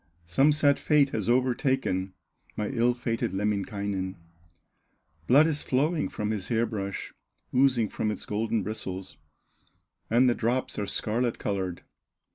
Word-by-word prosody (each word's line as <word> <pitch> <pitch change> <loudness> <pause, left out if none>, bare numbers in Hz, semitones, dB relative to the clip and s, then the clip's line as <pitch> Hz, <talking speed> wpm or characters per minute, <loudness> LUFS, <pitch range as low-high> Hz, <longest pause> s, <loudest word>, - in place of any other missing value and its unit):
Some 135 - +4
sad 145 -1 +3
fate 145 -2 +3
has 110 0 -2
overtaken 125 -6 +1 0.4
My 105 -1 -2
ill 120 -1 +2
fated 115 -5 -2
Lemminkainen! 100 -1 -2 1.1
Blood 140 +5 +7
is 155 -2 0
flowing 150 +5 0
from 105 0 -3
his 105 -4 -3
hair 115 0 +1
brush, 100 -4 -5 0.4
Oozing 125 -4 +4
from 110 - -2
its 105 - -4
golden 110 0 -1
bristles, 95 -3 -5 0.9
And 120 +3 +4
the 120 - +4
drops 120 +1 -1
are 100 - -2
scarlet 115 +4 -1
colored." 95 -3 -3
115 Hz, 130 wpm, -27 LUFS, 100-130 Hz, 1.1 s, Blood